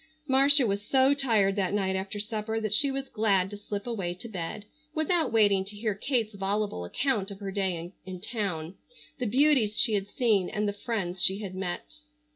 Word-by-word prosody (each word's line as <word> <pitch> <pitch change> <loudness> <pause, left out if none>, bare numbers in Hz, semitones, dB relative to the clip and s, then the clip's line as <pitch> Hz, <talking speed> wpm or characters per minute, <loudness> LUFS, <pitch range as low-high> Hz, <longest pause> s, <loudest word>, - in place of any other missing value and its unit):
Marcia 275 0 +5
was 200 -2 0
so 265 +5 +4
tired 225 -9 +2
that 200 -1 0
night 190 -2 0
after 195 +2 -4
supper 215 +1 -3
that 215 -2 -1
she 280 +6 +5
was 270 0 -3
glad 200 -4 +1
to - - -5
slip 205 0 -5
away 195 -8 -3
to 185 - -9
bed, 195 0 -5 0.3
without 320 +2 +1
waiting 205 -4 +4
to 200 +2 -9
hear 215 0 -1
Kate's 225 +1 -1
voluble 200 - -2
account 215 - -1
of 200 -1 -9
her 200 -1 -5
day 185 -3 -2
in 185 -1 -7
town, 185 -6 -3 0.5
the 250 - -1
beauties 250 -3 +3
she 235 -5 +4
had 200 -1 0
seen 205 -4 +1
and 210 0 -1
the 205 - -1
friends 200 -5 -3
she 190 +2 +4
had 195 -3 -6
met. 180 - -5
205 Hz, 195 wpm, -28 LUFS, 190-230 Hz, 0.5 s, Marcia